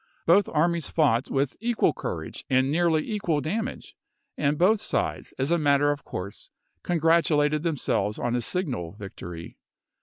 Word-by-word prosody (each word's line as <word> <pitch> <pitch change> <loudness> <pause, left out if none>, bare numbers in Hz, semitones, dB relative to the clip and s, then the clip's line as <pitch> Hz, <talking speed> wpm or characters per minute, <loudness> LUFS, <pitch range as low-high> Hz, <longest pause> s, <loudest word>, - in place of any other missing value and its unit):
Both 185 +4 +4
armies 170 +1 +1
fought 135 -6 +2
with 135 0 -1
equal 235 +1 +1
courage - - -5
and 130 +1 +3
nearly 160 -1 +2
equal 185 -8 0
damage, 220 - -4 0.4
and 145 0 0
both 200 +6 +3
sides, - - -2
as 135 +4 -1
a 170 - +3
matter 145 -1 +3
of 145 0 -4
course, 95 +2 -7 0.3
congratulated 160 -3 +2
them 165 -2 -1
selves 105 -4 0
od 120 - -1
a 120 - 0
signal 125 - -2
victory. 90 -5 -9
150 Hz, 150 wpm, -26 LUFS, 130-170 Hz, 0.4 s, Both